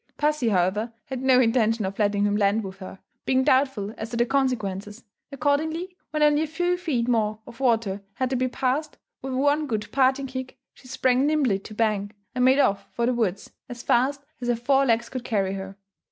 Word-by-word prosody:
Pussy, 300 Hz, -5 st, +1 dB
however, 200 Hz, +4 st, +1 dB
had 260 Hz, -2 st, -5 dB
no 260 Hz, -1 st, +5 dB
intention 225 Hz, -3 st, +2 dB
of 195 Hz, +2 st, -5 dB
letting 205 Hz, -1 st, +2 dB
him 205 Hz, 0 st, +2 dB
land 205 Hz, +1 st, +2 dB
with 190 Hz, 0 st, -8 dB
her, 190 Hz, 0 st, -9 dB, 0.3 s
being 260 Hz, 0 st, +2 dB
doubtful 260 Hz, -7 st, +1 dB
as 220 Hz, -, -5 dB
to 235 Hz, -, -4 dB
the 240 Hz, -, +3 dB
consequences; 225 Hz, -5 st, -2 dB, 0.3 s
accordingly, 315 Hz, +7 st, -1 dB
when 305 Hz, 0 st, 0 dB
only 295 Hz, 0 st, +4 dB
a 315 Hz, -, -1 dB
few 350 Hz, +3 st, 0 dB
feet 300 Hz, -10 st, -1 dB
more 215 Hz, -3 st, +1 dB
of 235 Hz, -, -13 dB
water 225 Hz, -6 st, +1 dB
had 260 Hz, 0 st, -1 dB
to -, -, +1 dB
be 255 Hz, 0 st, +1 dB
passed, 270 Hz, +4 st, -2 dB, 0.2 s
with 265 Hz, 0 st, -4 dB
one 290 Hz, +3 st, +2 dB
good 215 Hz, -4 st, -3 dB
parting 270 Hz, +1 st, +2 dB
kick, 260 Hz, 0 st, -6 dB, 0.2 s
she 255 Hz, -, -18 dB
sprang 260 Hz, +1 st, +2 dB
nimbly 280 Hz, -10 st, +2 dB
to 215 Hz, +2 st, -11 dB
bank, 210 Hz, -2 st, 0 dB, 0.2 s
and 250 Hz, -1 st, 0 dB
made 260 Hz, +1 st, +5 dB
off 200 Hz, -8 st, +2 dB
for 235 Hz, -, -1 dB
the 250 Hz, -, +2 dB
woods 215 Hz, -5 st, -2 dB, 0.2 s
as 245 Hz, -1 st, -8 dB
fast 275 Hz, +4 st, +1 dB, 0.2 s
as 240 Hz, -1 st, 0 dB
four 270 Hz, +3 st, +3 dB
legs 235 Hz, 0 st, +2 dB
could 255 Hz, -2 st, -6 dB
carry 195 Hz, -5 st, 0 dB
her. 195 Hz, 0 st, -7 dB
245 Hz, 200 wpm, -25 LUFS, 215-270 Hz, 0.3 s, no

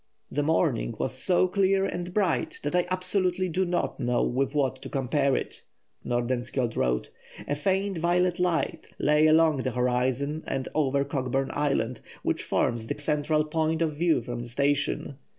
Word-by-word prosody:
"The 145 Hz, -, 0 dB
morning 145 Hz, -6 st, +1 dB
was 130 Hz, -, -1 dB
so 180 Hz, +7 st, +2 dB
clear 195 Hz, +1 st, +2 dB
and 175 Hz, -1 st, -4 dB
bright 210 Hz, -, 0 dB
that -, -, -2 dB
I 180 Hz, 0 st, +2 dB
absolutely 185 Hz, 0 st, +1 dB
do 185 Hz, +3 st, 0 dB
not 175 Hz, -3 st, -1 dB
know 125 Hz, -1 st, +1 dB
with 135 Hz, +4 st, 0 dB
what 135 Hz, -3 st, 0 dB
to -, -, -7 dB
compare 135 Hz, 0 st, +1 dB
it," -, -, -4 dB, 0.4 s
Nordenskjold 120 Hz, 0 st, -1 dB
wrote. 60 Hz, 0 st, 0 dB, 0.4 s
"A 145 Hz, -, 0 dB
faint 190 Hz, +4 st, 0 dB
violet 175 Hz, +1 st, +1 dB
light 180 Hz, -3 st, 0 dB
lay 150 Hz, +1 st, +4 dB
along 155 Hz, -1 st, +5 dB
the 130 Hz, 0 st, -1 dB
horizon 125 Hz, +4 st, 0 dB
and 135 Hz, -1 st, -2 dB
over 140 Hz, -2 st, +1 dB
Cockburn 135 Hz, -1 st, -1 dB
Island, 135 Hz, -5 st, 0 dB, 0.2 s
which -, -, 0 dB
forms 115 Hz, -1 st, 0 dB
the -, -, -3 dB
central 150 Hz, +1 st, +1 dB
point 160 Hz, +1 st, 0 dB
of 155 Hz, -2 st, -1 dB
view 165 Hz, -5 st, +2 dB
from 120 Hz, 0 st, -5 dB
the 120 Hz, -, -7 dB
station. 140 Hz, +1 st, -1 dB
150 Hz, 165 wpm, -27 LUFS, 130-175 Hz, 0.4 s, along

